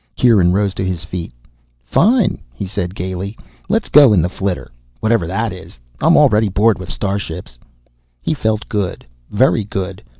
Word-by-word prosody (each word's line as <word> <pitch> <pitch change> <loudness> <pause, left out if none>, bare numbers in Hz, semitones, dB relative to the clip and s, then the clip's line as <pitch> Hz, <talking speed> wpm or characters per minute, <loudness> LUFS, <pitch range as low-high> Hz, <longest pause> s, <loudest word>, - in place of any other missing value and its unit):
Kieran 105 -8 +4
rose 100 0 +1
to 95 - -3
his 90 -3 -3
feet. 85 -4 -6 0.5
"Fine," 210 - +2
he 65 +11 -6
said 90 -1 -4
gaily. 95 +3 -5 0.3
"Let 220 +2 +2
us - - -11
go 140 -7 +7
in 90 - +4
the 90 - 0
flitter, 95 -8 -3 0.3
whatever 110 -6 +1
that 105 +4 -2
is. 90 -9 -12 0.2
I - - +2
am - - +6
already 105 0 +4
bored 105 +2 +2
with 90 - -8
starships." 95 - -4 0.6
He 60 - -1
felt 110 -6 -1
good, 105 -5 -3 0.2
very 110 0 +2
good. 95 -2 -5
100 Hz, 170 wpm, -17 LUFS, 90-110 Hz, 0.6 s, go